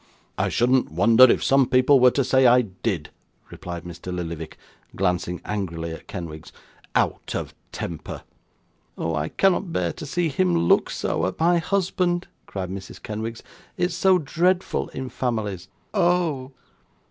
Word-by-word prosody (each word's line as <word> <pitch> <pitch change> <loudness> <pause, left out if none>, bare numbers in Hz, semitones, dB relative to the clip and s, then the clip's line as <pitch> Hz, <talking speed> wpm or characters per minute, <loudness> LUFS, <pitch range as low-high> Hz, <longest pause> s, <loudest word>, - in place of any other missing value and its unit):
'I - - +1
shouldn't 125 - +2
wonder 115 +9 +7
if 130 - +3
some 135 -1 +4
people 130 +2 +5
were 125 0 +7
to 140 +2 0
say 130 0 +4
I 125 +1 +6
did,' 95 -5 -4 0.4
replied 85 -1 -7
Mr 90 +1 -8
Lillyvick, 85 -3 -5 0.4
glancing 90 -1 -1
angrily 85 -6 -3
at 80 - -9
Kenwigs. 85 -5 -7 0.4
'Out - - 0
of - - -4 0.2
temper!' 85 -3 -6 0.7
'Oh! 80 - -2
I 80 0 -1
cannot 195 -1 +1
bear 85 - -1
to 150 - -8
see 175 +2 0
him 95 - +1
look 85 0 +3
so, - - -1
at 95 - -6
my 170 +1 +4
husband,' 180 -1 0 0.2
cried 95 -2 -5
Mrs 95 0 -8
Kenwigs. 110 +2 -5 0.3
'It's 180 +1 0
so 190 -1 +4
dreadful 175 +4 0
in 130 0 -6
families. 110 -8 -3 0.3
Oh! 175 -8 +1
115 Hz, 145 wpm, -24 LUFS, -, 0.7 s, wonder